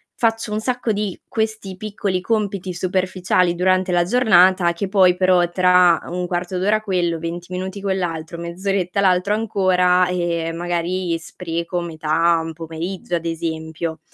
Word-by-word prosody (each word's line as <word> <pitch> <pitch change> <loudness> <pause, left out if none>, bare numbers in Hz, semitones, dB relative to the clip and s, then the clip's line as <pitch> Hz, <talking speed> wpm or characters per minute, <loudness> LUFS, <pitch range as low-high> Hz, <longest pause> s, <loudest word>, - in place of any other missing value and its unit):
faccio 225 -2 0
un 215 - -1
sacco 245 -1 -1
di 205 -3 -2
questi 220 -4 -3
piccoli 200 -2 -2
compiti 200 -3 -2
superficiali 185 -1 0
durante 185 0 +1
la 175 0 +3
giornata 185 -5 +4
che 190 +3 -4
poi 185 -3 +4
però, 180 -2 +3
tra 180 -1 +4
1/4 180 +1 -3
d'ora 210 +4 +1
quello, 175 -5 -1
20 175 +2 -6
minuti 190 +2 -4
quell'altro, 170 -4 -3
mezz'oretta 180 +2 -2
l'altro 190 +1 +2
ancora, 185 -4 +2
ehm, 170 -2 -1
magari 175 0 -1
spreco 170 +1 -4
metà 165 0 +1
un 165 - -5
pomeriggio, 165 +3 -5
ad 170 - -3
esempio. 160 -1 -4
180 Hz, 135 wpm, -20 LUFS, 170-190 Hz, -, giornata